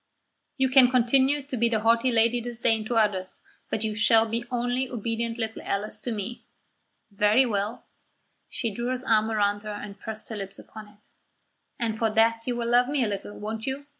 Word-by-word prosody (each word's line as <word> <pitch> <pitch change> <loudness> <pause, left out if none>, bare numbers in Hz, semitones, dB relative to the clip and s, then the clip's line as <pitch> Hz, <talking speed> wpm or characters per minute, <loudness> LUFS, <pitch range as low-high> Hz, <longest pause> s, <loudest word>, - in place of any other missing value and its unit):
"You 265 -1 +3
can 260 -1 +6
continue 265 +3 +3
to 270 -1 -6
be 235 0 +2
the 220 -2 0
haughty 230 +3 +3
Lady 235 +1 +3
Disdain 230 -2 -1
to 235 - -2
others, 200 -4 0 0.3
but 220 - -2
you 215 -1 -1
shall 225 +1 +4
be 230 +1 -2
only 245 +1 -1
obedient 230 0 -3
little 225 -1 -4
Alice 200 +2 -3
to 245 - -4
me." 220 +2 -5 0.7
"Very 210 +6 +4
well." 210 0 -2 0.6
She 230 -5 -3
drew 235 +4 -3
his 255 0 -2
arm 220 -3 +2
towards 205 -1 0
her 215 - -6
and 205 -1 -7
pressed 220 +1 -7
her 220 - -5
lips 195 -1 -7
upon 215 -1 -11
it. 210 0 -20 0.8
"And 225 -4 -2
for 225 - +2
that 225 +1 +2
you 245 - 0
will 235 -1 -2
love 245 +1 +4
me 285 -3 +1
a - - +1
little, 205 0 -5
won't 220 +3 -5
you? 270 +2 -3
225 Hz, 195 wpm, -26 LUFS, 215-245 Hz, 0.8 s, can